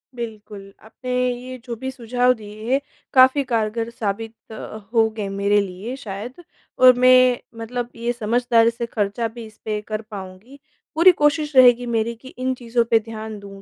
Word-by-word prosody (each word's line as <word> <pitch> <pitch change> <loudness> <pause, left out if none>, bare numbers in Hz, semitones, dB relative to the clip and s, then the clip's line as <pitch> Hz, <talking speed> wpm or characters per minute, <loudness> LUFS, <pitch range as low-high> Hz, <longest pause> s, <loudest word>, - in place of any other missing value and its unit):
बिल्कुल 210 -4 -8
आपने 250 +3 -8 0.2
ये 255 +1 -8
जो 240 -2 -5
भी 260 +4 -5
सुझाव 250 0 +1
दिए 215 0 -8
हैं, 270 - +3 0.3
काफ़ी 260 +2 +6
कारगर 225 0 -1
साबित 225 0 -4 0.2
अ, 220 0 -8 0.2
होंगे 220 -2 +1
मेरे 205 +1 +3
लिए 200 +6 -6
शायद 240 - -8 0.4
और 255 0 +8
मैं 255 -1 +6 0.2
मतलब 240 +1 -4
ये 235 +1 -2
समझदारी 235 0 +2
से 235 0 -4
खर्चा 220 0 -2
भी 230 +1 -10
इस 215 -1 -15
पे 215 -1 -2
कर 215 0 -3
पाऊँगी। 210 +4 -11 0.4
पूरी 340 +4 +7
कोशिश 295 0 +2
रहेगी 245 -1 +6
मेरी 235 0 -1
कि 260 - -13
इन 260 +1 -1
चीज़ों 235 -1 0
पे 225 - +6
ध्यान 220 -1 -8
दूँ, 200 -1 -12
230 Hz, 170 wpm, -21 LUFS, 215-250 Hz, 0.4 s, और